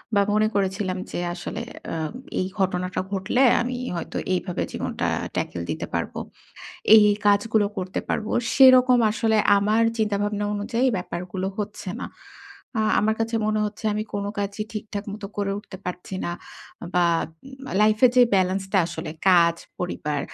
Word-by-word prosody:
বা 200 - +5
মনে 215 0 +3
করেছিলাম 190 -1 0
যে, - - -3
আসলে, 190 +5 -5 0.3
আ - - -2 0.4
এই 185 - 0
ঘটনাটা 180 -1 0
ঘটলে 195 +6 0 0.2
আমি 250 +1 -2 0.2
হয়তো 170 - -5 0.2
এইভাবে 180 -1 -2
জীবনটা - - -3 0.3
tackle 85 -1 -2
দিতে 80 - -3
পারব। - - -2 0.8
এই, 220 - +10
এই 205 - +1
কাজগুলো 205 +1 +3
করতে 185 0 -3
পারব। 215 - -1 0.3
সেরকম 255 -2 +7
আসলে 220 0 +1 0.2
আমার 215 +3 +2 0.2
চিন্তা-ভাবনা 205 -1 0
অনুযায়ী 230 +5 -1
এই - - 0
ব্যাপারগুলো 180 +1 -4
হচ্ছে 210 -2 -4
না। - - -4 0.7
আ - - +3 0.2
আমার 220 +1 +2
কাছে 225 0 0
মনে 215 0 +1
হচ্ছে 210 +1 -9
আমি 215 - -1
কোন 200 - -2
কাজই 200 +1 -2
ঠিকঠাক 210 -1 -5
মতো 205 -1 -6
করে 200 -1 0
উঠতে 205 -2 -10
পারছি 180 +1 -5
না - - -2 0.6
বা 175 -1 +4 0.4
উম 270 -1 -12 0.2
লাইফ 215 0 +4
এর 250 - +7
যে 250 - +8
ব্যালান্সটা 190 +1 +1
আসলে 165 -2 -6 0.2
কাজ, 170 -2 +5 0.2
পরিবার, 150 -5 -2
205 Hz, 155 wpm, -24 LUFS, 185-215 Hz, 0.8 s, এই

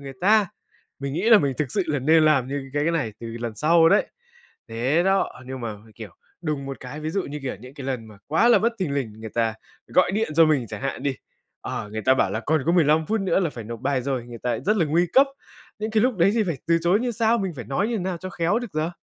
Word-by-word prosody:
người 135 -1 -8
ta. 210 +1 +4 0.5
Mình 140 0 -4
nghĩ 185 +9 0
là 220 - +9
mình 140 -3 0
thực 145 -5 -1
sự 200 - +1
là 150 -2 0
nên 155 +4 +4
làm 140 -5 +3
như 135 -1 -5
cái 145 0 +1
cái 165 - +1
này 135 -10 -1
từ 115 - -6
lần 115 -2 -4
sau 165 +6 +4
đấy. - - +3 0.6
Thế 130 +9 +1
đó, 195 0 +2
nhưng 130 -1 -6
mà, 110 -3 -4
mình, 110 +1 -18
kiểu, 110 -3 -10 0.3
đùng 150 -4 -3
một 135 - -7
cái, 135 +4 -8
ví 155 +1 -3
dụ 195 +2 -1
như, 150 +1 -6
kiểu, 130 - -4
những 125 +3 -12
cái 135 -2 -8
lần 125 -4 -3
mà 105 -2 -15
quá 160 +11 +3
là 240 - +6
bất 230 +2 +1
thình 155 -7 -2
lình, 125 -7 -2
người 110 -1 -7
ta 115 -2 +1 0.3
gọi 185 +1 +3
điện 220 -3 0
cho 165 - +8
mình 140 -6 +1
chẳng 105 +3 -7
hạn 135 -1 -3
đi, 140 -2 -1 0.4
ờ, 105 - -5
người 110 0 -4
ta 130 - +4
bảo 95 - +1
là 110 +3 -2
còn 155 +2 0
có 170 - +3
15 160 -2 +3
phút 220 -1 0
nữa 190 -1 +1
là 170 - 0
phải 115 -5 -8
nộp 115 +1 -7
bài 135 -2 0
rồi, 130 -3 -2
người 120 -1 -9
ta 125 -1 -2
rất 210 +3 +1
là 170 - +3
nguy 170 +4 +2
cấp. 275 +2 +6 0.5
Những 215 +1 -3
cái 215 0 +2
lúc 250 -4 +1
đấy 180 +3 +4
thì 230 - +2
phải 170 -6 -2
từ 165 0 +3
chối 180 +5 +3
như 245 0 -1
sao, 230 +1 +2
mình 190 -3 -2
phải 125 - -6
nói 180 - -1
như 230 -3 -1
nào 180 -1 -2
cho 185 +1 -7
khéo 175 +7 0
được 240 -5 -7
giờ? 155 +2 -1
150 Hz, 285 wpm, -24 LUFS, 130-185 Hz, 0.6 s, là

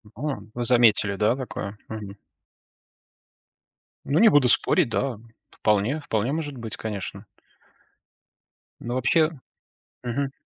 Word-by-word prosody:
А, 145 +4 -3
вы 120 0 -3
заметили, 115 -5 +4
да, 105 +5 +2
такое? 105 -6 -6
Мгм. 105 -2 -7 1.9
Ну, 145 +5 +1
не 225 - +8
буду 145 -9 +4
спорить, 175 -9 +4
да. 125 0 -1 0.3
Вполне 105 +8 +1
вполне 115 -3 -1
может 145 -3 -3
быть, 110 -3 -6
конечно. 105 -3 -6 1.6
Но 120 +1 -4
вообще, 155 +5 +3 0.7
мгм. 135 +3 -2
120 Hz, 110 wpm, -25 LUFS, 105-140 Hz, 1.9 s, не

